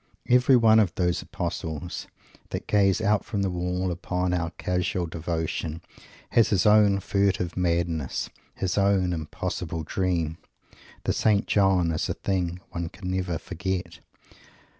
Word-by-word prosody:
Every 125 Hz, +2 st, +5 dB
one 110 Hz, -2 st, +6 dB
of 100 Hz, -5 st, +2 dB
those 90 Hz, -1 st, +1 dB
Apostles 80 Hz, +2 st, -4 dB, 0.4 s
that -, -, -4 dB
gaze 100 Hz, -2 st, +3 dB
out 105 Hz, 0 st, +2 dB
from 100 Hz, -3 st, -2 dB
the 95 Hz, -, 0 dB
wall 90 Hz, +1 st, -1 dB
upon 90 Hz, +1 st, -1 dB
our 85 Hz, -2 st, 0 dB
casual 90 Hz, 0 st, -1 dB
devotion 80 Hz, -1 st, -3 dB, 0.5 s
has 115 Hz, -, +4 dB
his 95 Hz, -4 st, +2 dB
own 105 Hz, -2 st, +5 dB
furtive 95 Hz, -3 st, 0 dB
madness, 85 Hz, -5 st, -1 dB, 0.2 s
his 95 Hz, +1 st, -1 dB
own 100 Hz, -2 st, +2 dB
impossible 80 Hz, +1 st, -4 dB
dream! 85 Hz, -2 st, -1 dB, 0.6 s
The -, -, +1 dB
St. 105 Hz, -2 st, +2 dB
John 95 Hz, -4 st, +3 dB
is 80 Hz, -, -1 dB
a -, -, -1 dB
thing 90 Hz, -2 st, -2 dB
one 85 Hz, -2 st, -3 dB
can 90 Hz, 0 st, -6 dB
never 90 Hz, -2 st, -1 dB
forget. 90 Hz, -1 st, -4 dB
90 Hz, 140 wpm, -26 LUFS, 85-100 Hz, 0.6 s, one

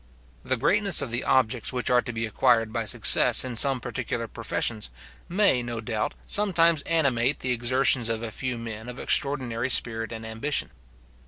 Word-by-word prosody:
The 130 Hz, -, -2 dB
greatness 195 Hz, -, +3 dB
of 120 Hz, -, -7 dB
the 120 Hz, +1 st, -2 dB
objects 125 Hz, -3 st, 0 dB
which 125 Hz, -1 st, -3 dB
are 125 Hz, 0 st, +3 dB
to 120 Hz, -, -6 dB
be 115 Hz, 0 st, -4 dB
acquired 115 Hz, 0 st, 0 dB
by 115 Hz, -1 st, -3 dB
success 105 Hz, -, +4 dB
in 125 Hz, -2 st, -6 dB
some 135 Hz, +2 st, +4 dB
particular -, -, -5 dB
professions 110 Hz, -, -3 dB, 0.4 s
may, 185 Hz, -8 st, +2 dB
no 120 Hz, -1 st, -6 dB
doubt, 110 Hz, -1 st, -4 dB
sometimes 170 Hz, -6 st, +3 dB
animate 140 Hz, -5 st, 0 dB
the 125 Hz, -, -2 dB
exertions 125 Hz, 0 st, +2 dB
of 115 Hz, 0 st, -3 dB
a 115 Hz, -, -5 dB
few 125 Hz, +1 st, -4 dB
men 115 Hz, 0 st, -8 dB
of 125 Hz, -, -9 dB
extraordinary 130 Hz, -3 st, +1 dB
spirit 115 Hz, -2 st, 0 dB
and 115 Hz, -1 st, -8 dB
ambition. 115 Hz, +7 st, -1 dB
120 Hz, 170 wpm, -24 LUFS, 115-135 Hz, 0.4 s, success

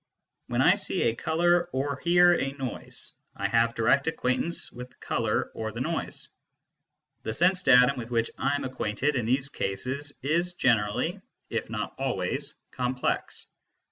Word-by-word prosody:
When -, -, +1 dB
I -, -, +7 dB
see -, -, -1 dB
a 115 Hz, -, +2 dB
colour 175 Hz, +4 st, +2 dB
or 140 Hz, +1 st, -1 dB
hear 175 Hz, +3 st, +5 dB
a 135 Hz, -5 st, -1 dB
noise, 135 Hz, -4 st, -4 dB, 0.2 s
I -, -, -1 dB
have 115 Hz, 0 st, +2 dB
direct 125 Hz, +6 st, +3 dB
acquaintance 160 Hz, +2 st, -1 dB
with 125 Hz, +1 st, -8 dB
the -, -, -27 dB
colour -, -, -1 dB
or 110 Hz, -1 st, -4 dB
the 115 Hz, -, -7 dB
noise. 160 Hz, +5 st, -3 dB, 0.9 s
The 110 Hz, -, -3 dB
sense 180 Hz, +1 st, +3 dB
datum 125 Hz, -4 st, +6 dB
with 115 Hz, 0 st, -6 dB
which 115 Hz, -1 st, 0 dB
I 140 Hz, +2 st, 0 dB
am 145 Hz, -, -2 dB
acquainted 130 Hz, +2 st, -1 dB
in 120 Hz, -4 st, 0 dB
these 130 Hz, +3 st, +1 dB
cases 135 Hz, +8 st, -3 dB
is 170 Hz, +5 st, +1 dB
generally, 125 Hz, -, +1 dB, 0.3 s
if -, -, -2 dB
not -, -, -3 dB
always, -, -, -2 dB, 0.2 s
complex. 125 Hz, 0 st, -2 dB
130 Hz, 155 wpm, -27 LUFS, 120-160 Hz, 0.9 s, I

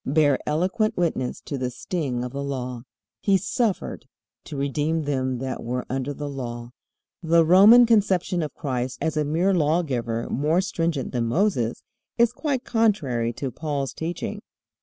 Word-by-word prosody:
bear 145 Hz, -1 st, +3 dB
eloquent 185 Hz, +8 st, 0 dB
witness 160 Hz, -8 st, -1 dB
to 140 Hz, -, -5 dB
the 125 Hz, -1 st, -1 dB
sting 125 Hz, -1 st, -3 dB
of 125 Hz, -, -5 dB
the 140 Hz, +1 st, -4 dB
Law. 125 Hz, -3 st, -4 dB, 0.4 s
He 195 Hz, -1 st, +4 dB
suffered 210 Hz, +1 st, -2 dB, 0.4 s
"to 150 Hz, -, -7 dB
redeem 150 Hz, +3 st, 0 dB
them 130 Hz, -3 st, -1 dB
that 130 Hz, +1 st, -4 dB
were 125 Hz, +1 st, -3 dB
under 135 Hz, +1 st, -2 dB
the 145 Hz, +1 st, -5 dB
law." 120 Hz, -4 st, -6 dB, 0.5 s
The 165 Hz, -1 st, +4 dB
Roman 205 Hz, +8 st, +8 dB
conception 195 Hz, -6 st, +2 dB
of 150 Hz, -3 st, -4 dB
Christ 130 Hz, -2 st, -3 dB
as 160 Hz, -1 st, -1 dB
a 155 Hz, -, +1 dB
mere 165 Hz, +7 st, +1 dB
lawgiver 145 Hz, -9 st, 0 dB
more 150 Hz, +6 st, +2 dB
stringent 165 Hz, -7 st, -1 dB
than 120 Hz, -2 st, -1 dB
Moses, 125 Hz, -, 0 dB, 0.3 s
is 235 Hz, 0 st, +4 dB
quite 275 Hz, -4 st, -2 dB
contrary 155 Hz, -, +1 dB
to 130 Hz, +2 st, -4 dB
Paul's 140 Hz, 0 st, -3 dB
teaching. 165 Hz, +1 st, -4 dB
150 Hz, 155 wpm, -24 LUFS, 130-180 Hz, 0.5 s, Roman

